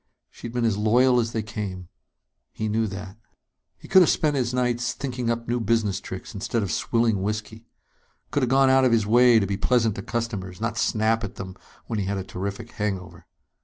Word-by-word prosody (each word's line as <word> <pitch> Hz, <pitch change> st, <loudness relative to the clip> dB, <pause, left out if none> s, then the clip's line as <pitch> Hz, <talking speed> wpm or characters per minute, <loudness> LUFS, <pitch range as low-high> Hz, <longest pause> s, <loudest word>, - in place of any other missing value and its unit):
She'd 115 Hz, -, -8 dB
been 120 Hz, -1 st, 0 dB
as 105 Hz, -3 st, +1 dB
loyal 125 Hz, +4 st, +4 dB
as 115 Hz, -1 st, -1 dB
they 110 Hz, -2 st, -2 dB
came, 100 Hz, -4 st, -6 dB, 0.6 s
he 110 Hz, -, -3 dB
knew 110 Hz, +1 st, 0 dB
that. 100 Hz, 0 st, -8 dB, 0.6 s
He -, -, -14 dB
could 190 Hz, -1 st, +7 dB
have 175 Hz, -, +5 dB
spent 150 Hz, -2 st, +1 dB
his 125 Hz, -3 st, 0 dB
nights 125 Hz, -1 st, 0 dB
thinking 125 Hz, -3 st, -3 dB
up 115 Hz, 0 st, -2 dB
new 120 Hz, +1 st, 0 dB
business 110 Hz, -3 st, 0 dB
tricks, 95 Hz, -, -8 dB
instead 110 Hz, +2 st, -2 dB
of 95 Hz, -, -3 dB
swilling 115 Hz, +1 st, +1 dB
whiskey. 110 Hz, +2 st, -4 dB, 0.6 s
Could 145 Hz, -1 st, +1 dB
have 125 Hz, -, +1 dB
gone 135 Hz, 0 st, +5 dB
out 130 Hz, 0 st, +5 dB
of 130 Hz, -, +4 dB
his 110 Hz, -2 st, +3 dB
way 120 Hz, +2 st, +6 dB
to 105 Hz, -, +2 dB
be 100 Hz, 0 st, -2 dB
pleasant 115 Hz, 0 st, +2 dB
to -, -, -6 dB
customers, 105 Hz, -6 st, -4 dB
not 115 Hz, +1 st, -2 dB
snap 115 Hz, 0 st, +1 dB
at 100 Hz, -, -5 dB
them 95 Hz, -1 st, -7 dB, 0.3 s
when 110 Hz, -2 st, -3 dB
he 100 Hz, -, -1 dB
had 100 Hz, +1 st, -2 dB
a 95 Hz, -, -3 dB
terrific 100 Hz, +5 st, -6 dB
hangover. 100 Hz, -4 st, -4 dB
115 Hz, 205 wpm, -24 LUFS, 100-120 Hz, 0.6 s, could